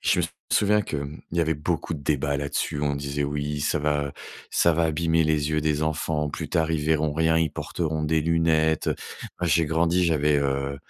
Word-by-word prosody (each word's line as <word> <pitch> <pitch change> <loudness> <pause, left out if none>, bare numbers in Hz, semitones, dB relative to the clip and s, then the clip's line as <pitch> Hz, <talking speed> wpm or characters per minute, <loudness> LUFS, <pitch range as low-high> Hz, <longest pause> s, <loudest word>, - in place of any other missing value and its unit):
Je - - +2
me - - +2 0.3
souviens 105 +1 +3
que, 80 - -4
hem, 70 +2 -6
il 85 - -2
y - - +5
avait 80 -1 +1
beaucoup 80 +2 -2
de 70 - -8
débats 70 0 0
là-dessus. 70 +1 -2
On 70 -1 0
disait: 70 +1 -3
«Oui, 75 +1 -3
ça 75 +1 +1
va 75 -1 -1 0.4
ça 85 - +3
va 85 +1 +1
abîmer 80 +1 +2
les 75 -1 +1
yeux 75 0 +1
des 75 0 0
enfants. 80 -1 -1
Plus - - -5
tard, 80 -1 +1
ils 80 - 0
verront 80 -1 +1
rien, 80 +1 +2
ils 80 -2 0
porteront 80 -2 -3
des 80 +1 +1
lunettes, 80 -1 +2
heu». - - 0 0.4
Moi, 90 - 0
j'ai 85 0 +3
grandi, 85 +3 +2
j'avais, 75 -3 +2
heu, 70 0 -1
80 Hz, 215 wpm, -25 LUFS, 75-80 Hz, 0.4 s, y